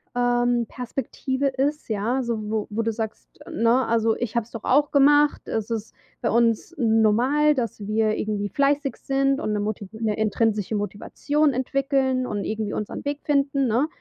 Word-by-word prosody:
ähm, 245 -1 +2
Perspektive 260 +3 -3
ist, 275 +3 -1
ja. 225 +5 0
So 235 -1 -2
wo 215 -1 -1
wo 220 +2 -2
du 225 0 0
sagst, 220 -1 -7
ne: 235 +3 +2
„Also, 225 -1 +2
ich 240 -2 -4
habe 235 - +2
es 235 - -23
doch 230 - -7
auch 290 +3 +3
gemacht. 290 +1 +4
Es 220 0 -2
ist 225 -1 -4 0.3
bei - - 0
uns 230 +6 +1
normal, 240 +6 +3
dass 230 -5 -3
wir 215 0 +1
irgendwie 205 -1 -2
fleißig 280 +2 +1
sind 275 0 0
und 215 - -2
'ne 210 - 0
moti 205 -1 -3
'ne 220 -1 -2
intrinsische 215 -1 0
Motivation 285 +8 0
entwickeln 265 0 0
und 205 -3 -3
irgendwie 215 -1 -3
unseren 210 - -4
Weg 285 0 -2
finden, 275 -2 +1
ne?“ 240 +6 +2
235 Hz, 170 wpm, -24 LUFS, 220-275 Hz, 0.3 s, gemacht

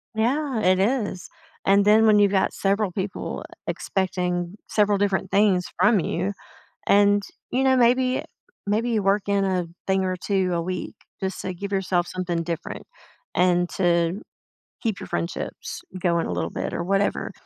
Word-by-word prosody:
Yeah, 255 +3 0
it 185 0 +3
is, 205 -3 -1 0.4
and 200 +1 +4
then 215 +2 +6
when 210 -1 +6
you've 200 -1 +4
got 190 -1 +1
several 200 0 0
people 190 +1 -4 0.2
expecting 180 -1 -2
several 205 -2 +2
different 195 -2 0
things 195 -3 +3
from 210 -2 +5
you 185 +4 -1 0.5
and, 205 0 +4 0.3
you 260 +2 +1
know, 265 -1 +4
maybe 255 +1 +3 0.4
maybe 220 +4 +1
you 220 -3 +1
work 195 +1 +1
in 200 -1 +2
a 185 -2 0 0.2
thing 190 0 +2
or 185 0 -1
2 185 0 0
a 170 - 0
week 180 +1 -4 0.3
just 190 0 -3
to 185 - -3
give 200 +3 -6
yourself 185 -2 +1
something 175 -2 -2
different 170 0 -5 0.5
and 180 -1 +3
to 175 +2 +1 0.6
keep 220 -5 -1
your - - -7
friendships 85 0 -4 0.2
going 170 -2 +1
a - - -3
little 85 -1 -2
bit - - -4
or - - -2
whatever. 195 +3 0
195 Hz, 160 wpm, -24 LUFS, 180-210 Hz, 0.6 s, then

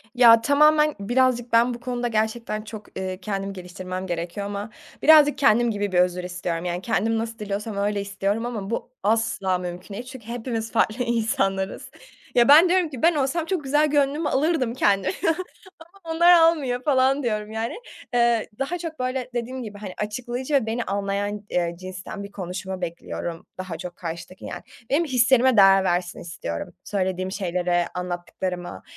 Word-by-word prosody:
Ya, 230 -2 +8
tamamen 300 +3 +4
birazcık 245 +2 +1
ben 235 +2 +4
bu 235 - -7
konuda 245 0 -2
gerçekten 220 -1 -1
çok, 215 -1 -10
eee, 185 -1 -3
kendimi 195 0 -3
geliştirmem 185 0 -6
gerekiyor 175 +3 -4
ama 205 +1 -5 0.3
birazcık 300 -2 +7
kendim 240 -3 +4
gibi 205 -2 -2
bir 180 - +3
özür 180 0 +2
istiyorum, 175 -1 -4
yani, 175 +1 -2
kendim 225 +1 0
nasıl 225 0 -4
diliyorsam 210 0 -4
öyle 205 0 0
istiyorum 200 +3 -2
ama 215 -5 -4
bu 235 - -4
asla 210 -3 +1
mümkün 180 +2 -7
değil 240 +5 -6
çünkü 255 -4 -11
hepimiz 230 -1 -4
farklı 230 +1 +1
insanlarız. 195 -5 -1 0.4
Ya, 240 -1 +5
ben 310 +5 +8
diyorum 360 -2 +2
ki 265 -5 -8
ben 335 +1 +4
olsam 295 +4 0
çok 355 -3 -2
güzel 295 +3 +3
gönlümü 290 +1 +1
alırdım 270 -4 +1
kendimin 195 -6 +1 0.8
ama 340 -5 -7
onlar 345 +2 +7
almıyor 320 -7 +4
falan 270 0 +3
diyorum 215 -3 -2
yani. 225 +2 -3 0.4
Eee, 235 -2 +3
daha 295 +6 -2
çok 325 -3 -6
böyle 255 0 -2
dediğim 245 +2 -3
gibi, 210 -2 -8
hani, 200 -3 -7
açıklayıcı 240 +6 -3
ve 265 -5 +3
beni 230 +2 -2
anlayan, 200 +1 -2
eee, 170 -1 0
cinsten 185 +2 -7
bir 200 - -10
konuşma 185 0 -5
bekliyorum 170 0 -5
daha 185 -3 -5
çok 175 +1 -7
karşıdaki 170 +2 -7
yani. - - -6 0.3
Benim 300 +5 +3
hislerime 260 -2 +4
değer 195 -1 +7
versin 175 -1 -1
istiyorum, 85 - -6
söylediğim 185 -1 -2
şeylere, 175 -2 0
anlattıklarıma. 180 - -4
220 Hz, 165 wpm, -24 LUFS, 190-255 Hz, 0.8 s, Ya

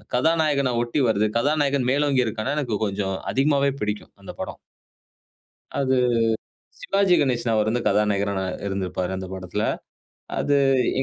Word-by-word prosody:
கதாநாயகன 145 -2 +2
ஒட்டி 120 +5 0
வருது. 110 0 +2
கதாநாயகன் 140 -1 +1
மேலோங்கி 140 -2 +2
இருக்கான்னா 115 +6 -2
எனக்கு 120 -8 -1
கொஞ்சம் 95 -1 -2 0.2
அதிகமாவே 140 0 +2
பிடிக்கும் 105 0 -3
அந்த - - -8
படம். - - -6 1.2
அது 130 -1 +2 0.9
சிவாஜி 200 - +3
கணேசன். 120 -4 +1
அவர் 110 0 +2
வந்து 120 +2 0
கதாநாயகரா 100 -1 +1
நா - - -2 0.2
இருந்திருப்பாரு 95 -1 -2
அந்த 95 0 -5
படத்தில. 95 +3 -3 0.8
அது 145 0 +2 0.4
எ - - +2
120 Hz, 130 wpm, -23 LUFS, 105-140 Hz, 1.2 s, சிவாஜி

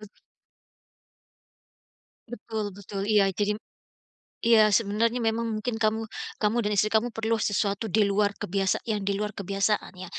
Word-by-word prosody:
Bet 210 -1 -13 2.2
Betul 220 -2 -4
betul, 200 0 -6
iya, 210 -2 +5
jadi 210 +1 0
m - - -49 0.8
iya 225 -2 +5
sebenarnya 225 +3 +1
memang 230 -1 0
mungkin 220 +1 -3
kamu 220 0 +1 0.3
kamu 215 +2 +1
dan 210 - -1
istri 215 +2 +2
kamu 225 +2 +2
perlu 225 -1 -1
sesuatu 205 +1 0
di 210 +2 +3
luar 205 0 +1
kebiasa 195 +1 0
yang 215 -3 -1
di 195 0 -1
luar 210 0 -3
kebiasaan 200 +2 -1
ya. 185 - -7
210 Hz, 145 wpm, -26 LUFS, 200-225 Hz, 2.2 s, iya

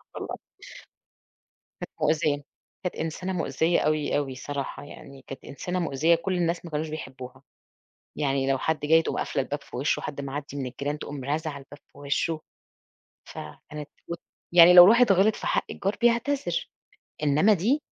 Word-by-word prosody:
اتطلقت. - - -5 1.4
كانت - - -6
مؤذية، 150 -3 +1 0.4
كانت 180 - -2
إنسانة 165 +4 -3
مؤذية 165 0 +1
أوي 155 -1 +1
أوي 145 -2 -1
الصراحة 140 +2 -5
يعني 135 -1 -12
كانت 135 - -9
إنسانة 180 +7 -4
مؤذية 165 0 +2
كُلّ 170 +3 -2
الناس 170 -1 -1
ما 170 - -8
كانوش 155 +1 -2
بيحبوها. 130 -4 -8 0.7
يعني 135 -2 0
لو 135 - +2
حد 160 +3 -1
جاي 160 +2 +4
تقوم - - -3
قافلة - - -1
الباب 145 +2 -5
في - - -10
وشه، 135 +4 0
حد 145 -1 -5
معدي 140 +1 -6
من 135 -2 -3
الجيران 140 +4 -4
تقوم 145 -3 -7
رازعة 155 +3 -2
الباب 135 +1 -13 0.2
في - - -18
وشه. 145 +3 -1 0.9
فكانت 150 - -9 0.6
ويعني 175 0 +9
لو 180 +1 +11
واحد 235 -1 +5
غِلط 195 +3 +4
في - - -5
حق - - +1
الجار 195 +2 -2
بيعتذر، 240 +4 +1 0.5
إنما 150 +8 +4
دي 235 - +1
150 Hz, 155 wpm, -26 LUFS, 140-175 Hz, 1.4 s, لو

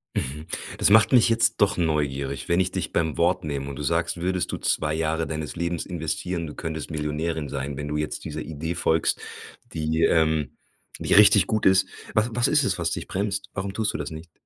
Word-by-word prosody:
Mhm, 75 +4 -3 0.3
das - - +3
macht 110 +5 +6
mich 120 -3 +6
jetzt 115 -2 +2
doch 100 0 +3
neugierig, 70 -5 -1
wenn 85 +1 +3
ich 95 0 +1
dich - - -3
beim 80 -3 0
Wort 85 -1 +2
nehme 70 -2 -3
und 70 - -7
du 75 - -5
sagst, 85 +3 0
würdest 90 +1 -1
du - - -3
2 75 -1 0
Jahre 80 +1 0
deines 75 -1 -5
Lebens 85 -1 -2
investieren, 85 0 -3
du 75 - -7
könntest 80 -1 -5
Millionärin 75 0 -2
sein, 70 0 -4
wenn 75 +1 -4
du 75 - -3
jetzt 75 0 -3
dieser - - -5
Idee 80 +2 -4
folgst, 80 -1 +1 0.5
die, 80 +1 0
ähm 80 -4 +2 0.4
die - - 0
richtig 100 -2 +7
gut 110 -1 0
ist. 95 0 +5 0.3
Was 110 +2 +2
was 120 0 +2
ist - - +4
es, - - 0
was - - -1
dich - - -4
bremst? 100 +1 -2
Warum 95 0 -4
tust 110 0 -1
du - - -2
das 75 +1 -5
nicht? 80 +2 -9
80 Hz, 210 wpm, -25 LUFS, 75-95 Hz, 0.5 s, richtig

